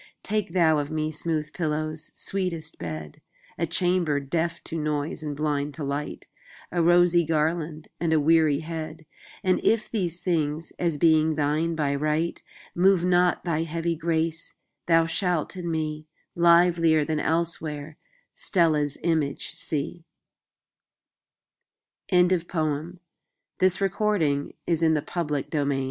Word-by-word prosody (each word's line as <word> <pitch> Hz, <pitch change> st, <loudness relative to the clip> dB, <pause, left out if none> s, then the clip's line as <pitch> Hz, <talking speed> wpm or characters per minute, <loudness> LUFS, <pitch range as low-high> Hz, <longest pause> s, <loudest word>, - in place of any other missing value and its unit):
Take 210 Hz, -5 st, -2 dB
thou 160 Hz, -4 st, +4 dB
of 145 Hz, 0 st, -3 dB
me 155 Hz, 0 st, -2 dB
smooth 155 Hz, -1 st, -2 dB
pillows, 155 Hz, 0 st, -3 dB
sweetest 170 Hz, -5 st, -3 dB
bed,A 80 Hz, -, -7 dB
chamber 175 Hz, -4 st, +1 dB
deaf 165 Hz, +4 st, -2 dB
to -, -, -7 dB
noise 150 Hz, -1 st, -2 dB
and 150 Hz, -2 st, -4 dB
blind 145 Hz, -1 st, -1 dB
to 155 Hz, -, -5 dB
light,A 145 Hz, +4 st, -5 dB
rosy 175 Hz, 0 st, +5 dB
garland 155 Hz, 0 st, -1 dB
and 165 Hz, -1 st, 0 dB
a 160 Hz, -, +4 dB
weary 155 Hz, -1 st, +3 dB
head:And 160 Hz, +3 st, -4 dB
if 225 Hz, -1 st, +1 dB
these 180 Hz, -6 st, -1 dB
things, 160 Hz, -3 st, -1 dB
as 170 Hz, -4 st, 0 dB
being 160 Hz, 0 st, +4 dB
thine 155 Hz, +3 st, 0 dB
by 145 Hz, -3 st, 0 dB
right, 155 Hz, +4 st, -1 dB, 0.3 s
Move 185 Hz, 0 st, +4 dB
not 180 Hz, 0 st, +3 dB
thy 165 Hz, -3 st, 0 dB
heavy 165 Hz, +1 st, -2 dB
grace, 165 Hz, 0 st, -2 dB, 0.3 s
thou 165 Hz, -1 st, +5 dB
shalt 170 Hz, 0 st, -1 dB
in 175 Hz, -2 st, -4 dB
me, 155 Hz, -1 st, -3 dB, 0.3 s
Livelier 170 Hz, -2 st, +4 dB
than 155 Hz, 0 st, -1 dB
elsewhere, 155 Hz, -2 st, -2 dB, 0.4 s
Stella's 155 Hz, -6 st, +1 dB
image 160 Hz, -5 st, -1 dB
see. 160 Hz, +3 st, -3 dB, 2.1 s
Contents 180 Hz, -2 st, +3 dB
BIBLIOGRAPHIC 170 Hz, +3 st, -3 dB
RECORD 210 Hz, +1 st, +1 dB
Previous 150 Hz, +3 st, -1 dB
Article 160 Hz, +1 st, +1 dB
Next 145 Hz, 0 st, -3 dB
Articl 145 Hz, -2 st, +1 dB
160 Hz, 120 wpm, -26 LUFS, 150-170 Hz, 2.1 s, rosy